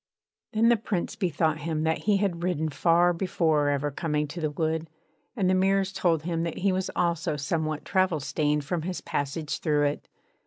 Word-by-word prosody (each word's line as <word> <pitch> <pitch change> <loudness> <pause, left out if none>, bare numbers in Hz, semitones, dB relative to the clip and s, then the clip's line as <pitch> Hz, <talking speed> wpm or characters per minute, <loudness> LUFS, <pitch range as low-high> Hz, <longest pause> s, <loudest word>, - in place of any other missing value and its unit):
Then 225 +2 +4
the 235 - +5
Prince 200 -4 -3
bethought 160 -4 0
him 155 0 -2
that 160 0 +1
he 205 - +5
had 190 -4 -1
ridden 165 -3 0
far 170 +3 +3
before 165 -5 +1
ever 145 +1 0
coming 150 0 -1
to 170 +4 -6
the 155 - 0
wood; 160 +2 -2 0.5
and 195 -6 +1
the 185 - +3
mirrors 195 +1 +2
told 165 -5 +1
him 165 -1 -1
that 170 -1 -3
he 195 +1 +2
was 185 0 -1
also 170 -3 0
somewhat 155 +1 -2
travel 185 -4 +2
stained 150 +1 0
from 170 +2 -1
his 180 +3 -4
passage 145 +2 -3
through 150 -2 +2
it. 145 +1 -2
165 Hz, 190 wpm, -27 LUFS, 150-185 Hz, 0.5 s, the